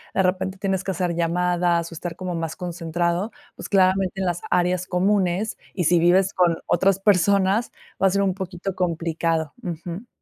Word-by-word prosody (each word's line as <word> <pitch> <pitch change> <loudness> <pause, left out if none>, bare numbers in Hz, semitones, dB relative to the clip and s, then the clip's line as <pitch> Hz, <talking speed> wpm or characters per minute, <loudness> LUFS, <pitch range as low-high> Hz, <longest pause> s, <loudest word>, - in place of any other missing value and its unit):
de 190 - +3
repente 185 +1 -1
tienes 190 -1 -1
que - - -5
hacer 180 -1 -1
llamadas 170 0 +1
o - - -8
estar 165 +1 -5
como 180 -1 -4
más 165 -1 -3
concentrado, 175 +3 -2 0.2
pues, - - -8
claramente 190 -1 +2
en 190 - 0
las 175 -1 -1
áreas 180 +1 +1
comunes, 190 +2 +1 0.2
y 180 - 0
si 175 +2 +4
vives 185 +3 +3
con 175 -2 +2
otras 190 +2 +2
personas, 200 +2 +3 0.3
va 195 - +6
a - - +4
ser 200 +1 +1
un 190 -2 +1
poquito 190 0 -5
complicado, 165 -3 -1
ujú. 175 +3 -6
180 Hz, 175 wpm, -23 LUFS, 170-190 Hz, 0.3 s, va